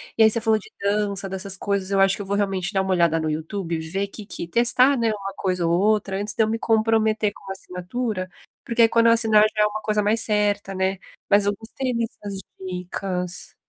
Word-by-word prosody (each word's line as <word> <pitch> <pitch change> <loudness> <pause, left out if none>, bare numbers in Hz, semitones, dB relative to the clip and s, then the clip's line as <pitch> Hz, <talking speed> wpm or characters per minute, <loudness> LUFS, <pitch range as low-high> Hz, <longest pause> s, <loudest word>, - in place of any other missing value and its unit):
E 225 - +1
aí 220 - +7
você 230 +2 +2
falou 220 -1 +2
de - - -16
dança, 200 -1 -1
dessas 190 0 -1
coisas, 200 -1 -2
eu 195 - +1
acho 195 0 +4
que - - -7
eu - - -6
vou 200 - -1
realmente 195 -1 -1
dar 190 - +1
uma 190 - -2
olhada 170 -3 +2
no 160 - -2
YouTube 165 +3 -4
e - - -3
ver 195 +3 -1
que 210 +2 -9
que 195 -4 -6
testar, 250 +7 +5
né, 235 -3 0
uma 195 -2 -6
coisa 180 -2 -2
ou 165 - +1
outra, 205 -1 +1
antes 210 +1 -1
de 225 - +3
eu - - 0
me 225 +1 -2
comprometer 220 -1 +1
com - - -18
uma 195 - -5
assinatura, 185 +2 -5 0.3
porque 230 -1 +3
quando 230 0 +3
eu 230 - +6
assinar, 220 -2 +6
já 210 - +4
é - - +4
uma 210 +1 -3
coisa 210 -1 0
mais 220 +2 +3
certa, 205 -2 +1
né. 190 0 -1 0.3
Mas 205 0 +3
eu 205 - +2
gostei 250 +3 -5
destas 210 -3 -5 0.2
dicas. 180 -1 -4
205 Hz, 230 wpm, -22 LUFS, 190-220 Hz, 0.3 s, aí